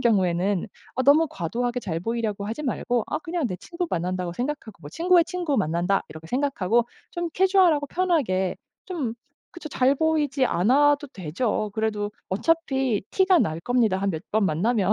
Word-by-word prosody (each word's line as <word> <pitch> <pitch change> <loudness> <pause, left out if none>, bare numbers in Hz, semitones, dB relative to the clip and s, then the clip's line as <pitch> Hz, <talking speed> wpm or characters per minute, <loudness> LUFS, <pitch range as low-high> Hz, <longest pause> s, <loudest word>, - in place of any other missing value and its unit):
경우에는 190 -2 +1 0.3
어 260 - 0
너무 290 +5 +5
과도하게 240 +7 -2
잘 165 -7 -3
보이려고 220 -1 -2
하지 230 +8 -4
말고 245 -3 0
아 - - -1
'그냥 330 -3 -2
내 180 - -4
친구 350 - -5
만난다.'고 180 +1 -2
생각하고 230 - -5
'친구의 345 - +4
친구 345 -6 -2
만난다.' 180 +2 +1
이렇게 160 +1 -11
생각하고 240 -4 +1 0.2
좀 345 -1 -3
캐주얼하고 370 -6 +4
편하게 275 - 0 0.3
좀 295 -12 -3 0.4
그쵸. 330 -3 -8
잘 260 0 +3
보이지 295 -3 +1
않아도 285 - +3
되죠. 210 - -2
그래도 210 -2 -1 0.2
어차피 265 - +1
티가 380 -2 +4
날 160 - 0
겁니다 225 -2 +2
한 195 +1 0
몇 160 -3 -4
번 215 0 +3
만나면. 200 +5 +1
240 Hz, 355 characters per minute, -25 LUFS, 190-300 Hz, 0.4 s, 너무